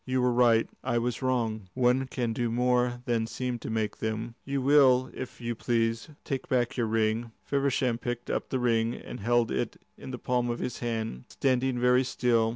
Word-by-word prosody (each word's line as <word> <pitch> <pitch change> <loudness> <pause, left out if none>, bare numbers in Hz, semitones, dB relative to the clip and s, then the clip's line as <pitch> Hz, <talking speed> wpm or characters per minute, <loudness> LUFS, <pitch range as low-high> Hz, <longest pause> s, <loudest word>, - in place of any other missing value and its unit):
You 130 0 0
were 125 -1 +3
right; 120 -2 +4 0.2
I 120 - 0
was 120 +1 -1
wrong. 115 -6 -1
One 130 +1 +2
can 120 -3 -2
do 120 +1 -1
more 125 +1 +1
than 115 -2 0
seem 120 +2 -3
to - - -6
make 110 -2 -1
them. 110 +1 -3
Will 135 -2 +4
you, - - -7
if 130 -1 -7
you 120 0 -2
please, 115 +2 0
take 135 -2 -4
back 120 -2 +1
your 120 -3 0
ring?" 110 +1 0
Feversham 135 -4 0
picked 120 0 -4
up - - -2
the 130 - 0
ring 115 -1 +1
and - - -8
held 120 +2 +2
it - - -2 0.2
in - - -8
the 125 - -4
palm 125 0 0
of 120 - -1
his 125 0 -4
hand, 110 - -3
standing 130 -1 +1
very 125 +1 +4
still. 120 -3 +2
120 Hz, 195 wpm, -28 LUFS, 115-125 Hz, 0.2 s, right